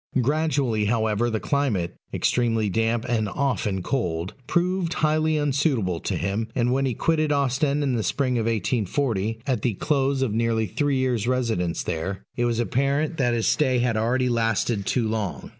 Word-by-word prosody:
Gradually, 135 -5 +1
however, 110 +1 +1
the 110 -1 -1
climate, 115 -13 0 0.2
extremely 115 -3 +1
damp 115 +2 0
and 110 -4 0
often 105 -8 -1
cold, 90 -9 -2
proved 175 +1 0
highly 155 0 +2
unsuitable 135 - +1
to - - -2
him; 100 +5 -2
and, 125 -1 +1
when 135 +1 +1
he 125 - -2
quitted 155 +1 +1
Ostend 140 +1 +1
in 135 -3 0
the 115 - 0
Spring 125 +5 0
of 115 - -1
1840, 115 0 -1
at 130 -6 0
the 115 -4 0
close 135 +2 +1
of 115 -5 -1
nearly 115 0 +1
three 140 - 0
years' 125 -4 0
residence 115 -10 0
there, 90 +4 -3
it 120 - 0
was 120 -1 0
apparent 140 +6 0
that 120 -4 +2
his 115 - 0
stay 130 -4 +2
had 120 -2 +1
already 125 +4 +1
lasted 115 -3 0
too 120 -3 +1
long. 110 -3 -3
120 Hz, 170 wpm, -24 LUFS, 110-140 Hz, 0.2 s, highly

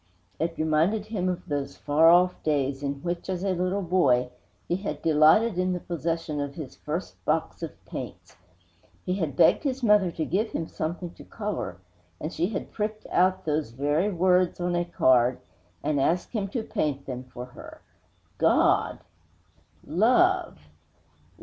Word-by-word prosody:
It 165 +1 -2
reminded 160 +7 +1
him 200 -4 -2
of 180 0 -4
those 140 -2 -3
far 155 +3 +4
off 180 +1 +4
days 140 -3 0
in 140 -1 -4
which, 175 +1 -3
as 185 -1 -2
a 195 - +1
little 185 +2 -1
boy, 125 -9 +2 0.4
he 175 - 0
had 170 -7 -4
delighted 165 +7 +4
in 185 0 +1
the 180 - -2
possession 165 -3 -3
of 140 0 -5
his 150 -5 -8
first 160 +5 -5
box 160 +2 -1
of 165 - -3 0.2
paints. - - -8 0.7
He 180 - 0
had 160 -8 -2
begged - - +5
his 270 -3 -2
mother 210 -4 +5
to 165 -2 -3
give 210 +8 -1
him 165 - -2
something 170 +2 -4
to - - -13
color, 210 - -4 0.4
and 155 - -5
she 175 - 0
had 205 -1 -5
pricked 215 0 -3
out 185 +1 +2
those 150 -3 0
very 145 - 0
words 180 0 +2
on 175 0 -1
a 175 0 0
card 130 -7 +3 0.5
and 145 -2 +1
asked 175 +6 0
him 210 -4 -2
to 220 +3 -3
paint 140 -7 -2
them 125 -1 -6
for 125 -1 -8
her. 125 - -12 0.6
_God! - - +3 0.8
Love! 330 - +3
170 Hz, 160 wpm, -26 LUFS, 150-190 Hz, 0.8 s, begged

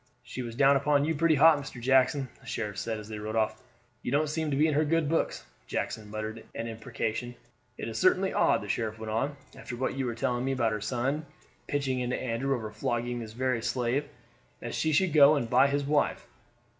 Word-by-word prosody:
"She 125 - -6
was 115 -2 -6
down 140 +2 +5
upon 145 +1 +2
you 160 - +1
pretty 160 +1 +3
hot, 155 +1 +6
Mr. 135 -3 -8
Jackson," 130 +2 +3
the - - -17
sheriff 105 -4 -3
said 115 -1 -2
as 105 -1 -9
they 110 -1 -6
rode 110 +1 -4
off. 110 -1 0 0.4
"You - - -4
don't 150 +2 +2
seem 160 0 -1
to 140 - 0
be 150 - +4
in 155 - +2
her 150 +2 +3
good 160 0 +1
books." 165 +2 -1 0.2
Jackson 110 -2 -3
muttered 110 +1 -5
an 115 - -3
imprecation. 115 +1 -4 0.4
"It - - -5
is 115 -1 -4
certainly 185 +1 +3
odd," - - +3
the - - -7
sheriff 110 +1 -2
went 110 -1 -6
on, 135 +6 -1 0.2
"after 120 - -7
what 130 +2 -1
you 135 -2 -1
were 120 - -3
telling 120 +1 -1
me 135 +1 0
about 120 -4 +1
her 105 -1 -3
son 135 +7 -1 0.4
pitching 135 -3 -1
into 125 0 -1
Andrew 130 +3 -1
over 110 -3 -5
flogging 120 +3 -2
this 110 -2 -7
very 125 -1 0
slave, 125 +4 -1 0.5
that 120 - -6
she 160 - 0
should 170 +2 +2
go 150 0 +7
and 120 -5 -2
buy 140 - +6
his 140 +1 0
wife. 145 +1 +1
125 Hz, 220 wpm, -29 LUFS, 115-145 Hz, 0.5 s, go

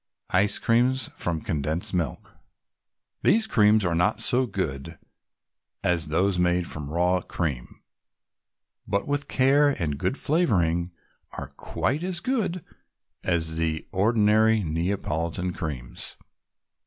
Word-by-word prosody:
ICE 100 +2 +6
CREAMS 125 +3 +2
FROM 85 -3 -2
CONDENSED 75 +4 -2
MILK 85 -7 -3 0.9
These 220 +4 +4
creams 110 - +4
are 85 - +1
not 90 +5 +1
so 125 +1 +1
good 80 - -4 0.9
as 85 -2 +1
those 90 +4 +1
made 90 0 +2
from 75 -3 -6
raw 90 +3 +1
cream, 70 -10 -4 1.0
but 100 0 -1
with 145 0 -1
care 140 +3 +4
and 75 - -2
good 130 - -1
flavoring 90 - +1 0.4
are - - -6
quite 145 +4 -2
as 180 -1 -2
good 195 - -2 0.6
as 80 -2 0
the 80 -1 -1
ordinary 110 +1 +3
Neapolitan 85 +1 -2
Creams. 70 -8 -6
90 Hz, 115 wpm, -25 LUFS, 80-120 Hz, 1.0 s, ICE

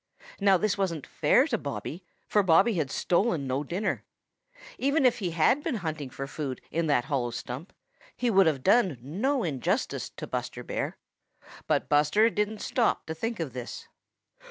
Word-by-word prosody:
Now 195 -2 +5
this 200 +1 0
wasn't 170 -7 -1
fair 165 - +3
to 235 -8 -1
Bobby, 150 +4 -5 0.2
for 210 - +3
Bobby 190 +5 +4
had 155 -7 -1
stolen 175 -4 +1
no 130 +2 -1
dinner. 180 +8 -2 0.8
Even 280 +1 +2
if 250 - +4
he 185 -4 -1
had 170 - +3
been 305 -4 -2
hunting 155 - -4
for 135 +2 -6
food 135 -2 -5
in 165 +1 0
that 135 -5 +2
hollow 135 -4 -1
stump, 125 - -6 0.5
he 245 -2 +1
would 195 -3 +5
have 140 -5 0
done 195 - +4
no 215 - -1
injustice 140 -7 -1
to - - -8
Buster - - -4
Bear. - - -3 0.7
But - - +1
Buster 150 +10 +4
didn't 210 0 -2
stop 235 -3 +1
to 160 - -4
think 225 +6 -3
of 160 -5 -3
this. 125 -1 -7
170 Hz, 170 wpm, -28 LUFS, 145-215 Hz, 0.8 s, Now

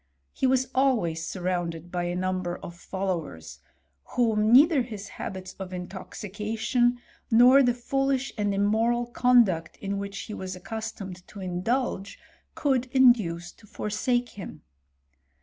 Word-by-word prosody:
He 265 - +1
was 260 0 +2
always 225 -12 +1
surrounded 175 -2 -3
by 175 -1 -1
a 175 0 -2
number 185 -1 -2
of 170 - -9
followers, 170 - -4 0.6
whom 220 -3 +2
neither 290 +3 +7
his 215 -4 -7
habits 185 -1 -7
of 190 -1 -6
in 180 -1 -5
toxication, 220 +5 -1 0.3
nor 245 +4 +7
the 245 -2 +3
foolish 270 +2 -1
and 205 -2 0
immoral 220 +4 +2
conduct 235 -9 +3
in 200 0 -3
which 200 0 -5
he 215 - -7
was 185 -2 -5
accustomed 195 -3 -7
to 205 - -11
indulge, 195 +3 -2 0.4
could 260 -3 +1
induce 225 -10 +3
to 215 - -20
forsake 240 +4 -1
him. 200 -4 -9
210 Hz, 130 wpm, -27 LUFS, 185-245 Hz, 0.6 s, neither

